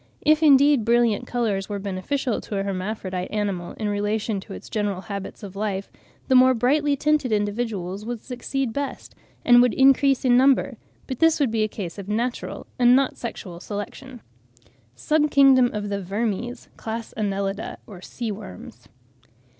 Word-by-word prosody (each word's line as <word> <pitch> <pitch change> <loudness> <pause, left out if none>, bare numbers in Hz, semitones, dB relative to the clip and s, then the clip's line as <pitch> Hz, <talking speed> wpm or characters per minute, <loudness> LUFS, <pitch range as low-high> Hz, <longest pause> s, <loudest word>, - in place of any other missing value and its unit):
If, 310 +1 +3
indeed, 285 -3 +5
brilliant 235 0 +2
colours 215 -5 -1
were 205 - -3
beneficial 200 +6 -2
to 205 - -5
a 195 - -1
hermaphrodite 190 -1 -4
animal 200 -5 -3
in 215 - -4
relation 205 +1 -1
to - - -10
its 90 - -10
general 205 -3 -2
habits 200 0 -7
of 200 -1 -8
life, 200 -1 -3 0.4
the 265 - +2
more 255 0 +6
brightly 285 +5 +2
tinted 295 -3 +1
individuals 205 -2 -2
would 235 +1 -4
succeed 255 -1 -3
best 280 +1 -5 0.3
and 245 0 +7
would 245 -2 +2
increase 270 0 +4
in 245 -1 +5
number; 265 -1 +3 0.3
but 260 -3 -6
this 325 -1 +4
would 275 -6 +1
be 225 -1 0
a 215 - +2
case 200 -3 -7
of 200 0 -8
natural 235 +4 -3
and 245 0 +6
not 270 0 +3
of - - -23
sexual 185 -7 -7
selection. 215 +6 -7 0.7
SUB 300 - +1
KINGDOM 270 -3 +5
OF 205 -1 -4
THE 200 0 -2
VERMES: 215 +5 -3
CLASS, 225 0 -6
ANNELIDA 200 -1 -3
(OR 190 -5 -12
SEA 230 +3 -5
WORMS). 120 - -10
220 Hz, 165 wpm, -23 LUFS, 200-255 Hz, 0.7 s, and